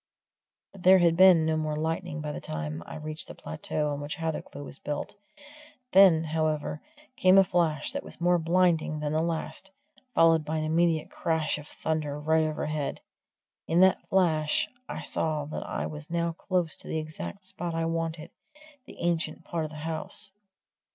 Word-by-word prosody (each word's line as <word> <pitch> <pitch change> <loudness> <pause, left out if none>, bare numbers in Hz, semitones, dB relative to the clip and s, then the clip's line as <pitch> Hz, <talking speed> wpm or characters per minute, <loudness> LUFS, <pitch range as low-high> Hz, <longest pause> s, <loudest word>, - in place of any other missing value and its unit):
But 195 - -13
there 185 +1 +7
had 170 -2 +4
been 180 -3 +7
no 160 0 +1
more 155 -1 -1
lightning 160 +1 -2
by 150 0 -3
the - - -6
time 75 +1 -4
I - - -7
reached 155 0 -6
the - - -9
plateau 155 -1 -3
on 145 0 -4
which 145 +1 -4
Hathercleugh 160 -3 -4
was 135 - -5
built; 145 -1 -4 0.8
then, 185 -5 +7
however, 155 -1 -1 0.3
came 185 -4 +5
a 195 - +9
flash 170 - 0
that 280 +1 -3
was - - -9
more 175 0 +3
blinding 165 -2 +2
than 150 0 -2
the 155 - +2
last, 165 +3 -3 0.5
followed 165 -1 +5
by 155 +1 -2
an 155 - -1
immediate 160 0 +1
crash 160 -2 0
of 150 - -11
thunder 155 -3 -3
right 160 +1 +2
overhead. 150 -1 -3 0.7
In 165 - +2
that 190 0 +3
flash 160 -5 +2 0.2
I - - -5
saw 155 -2 -1
that 150 - -6
I - - -2
was 150 0 -7
now 170 0 0
close 175 -1 -1
to - - -6
the - - -2
exact 155 +5 -6
spot 175 -2 -4
I 165 0 0
wanted 165 0 -3 0.6
the - - -12
ancient 165 -1 -1
part 165 -2 -3
of - - -5
the 155 - -10
house. 165 +4 -2
160 Hz, 180 wpm, -28 LUFS, 155-170 Hz, 0.8 s, a